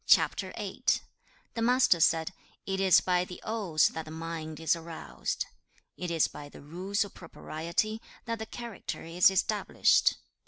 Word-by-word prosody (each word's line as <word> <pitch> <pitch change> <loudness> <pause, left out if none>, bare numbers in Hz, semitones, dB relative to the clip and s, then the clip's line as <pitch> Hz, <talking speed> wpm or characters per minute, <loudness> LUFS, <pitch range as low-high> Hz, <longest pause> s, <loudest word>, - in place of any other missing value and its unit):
The - - +2 0.8
Master 245 -6 +4
said, 165 +2 +3 0.3
'It 190 0 -2
is 190 -3 +6
by 180 -1 +2
the 180 0 -8
Odes 200 -9 +2
that 160 -1 -6
the - - -10
mind 160 -1 -5
is 160 0 +2
aroused. 165 0 -5 0.6
2. 180 - -3
'It - - -2
is 165 -2 +3
by 145 -1 -10
the - - -13
Rules 190 +8 -1
of 200 - -12
Propriety 170 +6 -3 0.2
that 230 -1 -3
the 220 - -5
character 235 -4 -6
is 170 +3 +5
established. 195 +2 +3
180 Hz, 150 wpm, -30 LUFS, 160-205 Hz, 0.8 s, is